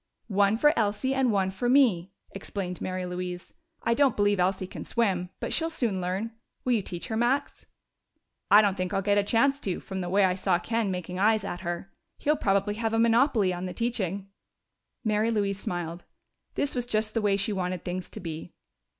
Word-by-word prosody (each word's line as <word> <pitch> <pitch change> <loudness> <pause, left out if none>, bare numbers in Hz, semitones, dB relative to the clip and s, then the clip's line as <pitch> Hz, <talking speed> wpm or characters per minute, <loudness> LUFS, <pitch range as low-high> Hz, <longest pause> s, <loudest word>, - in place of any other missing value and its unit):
"One 200 +1 +3
for 295 +5 +5
Elsie 215 +4 0
and 265 -3 +2
one 190 -2 +1
for 220 +6 -1
me," 220 -10 +4 0.2
explained 195 -2 -5
Mary 185 0 -3
Louise. 180 0 -5 0.3
"I 235 - +2
don't 275 -1 +3
believe 205 -1 +2
Elsie 185 +1 +1
can - - -8
swim, 190 -6 0
but - - -2
she'll 325 0 +2
soon 230 - -1
learn. 190 +6 -2 0.3
Will 250 - +3
you 225 - +2
teach 175 -2 -6
her, 220 - -1
Max?" 240 +5 0 0.8
"I 210 +1 +8
don't 200 -2 +2
think 185 +1 -2
I'll 195 - 0
get 205 +1 +3
a - - +2
chance 275 +7 +2
to, 190 -9 -2
from 190 -1 -5
the 175 - -3
way 195 +2 +4
I 185 - +2
saw 185 -1 +1
Ken 225 +3 -1
making 180 0 -4
eyes 215 +1 +3
at 175 - -5
her. 175 +2 -5 0.2
He'll 300 +1 +2
probably 200 -4 +1
have 225 +1 -2
a 225 - +2
monopoly 230 -4 +3
on 180 +1 -4
the 180 - -6
teaching." 200 -5 -2 0.8
Mary 215 0 +1
Louise 200 -3 0
smiled: 175 -2 -4 0.5
this 285 - -1
was 245 -1 -2
just 215 -2 0
the 225 - +1
way 200 -1 +2
she 205 +2 0
wanted 180 -2 -3
things 180 0 -4
to - - -8
be. 165 -4 -7
200 Hz, 200 wpm, -27 LUFS, 185-230 Hz, 0.8 s, I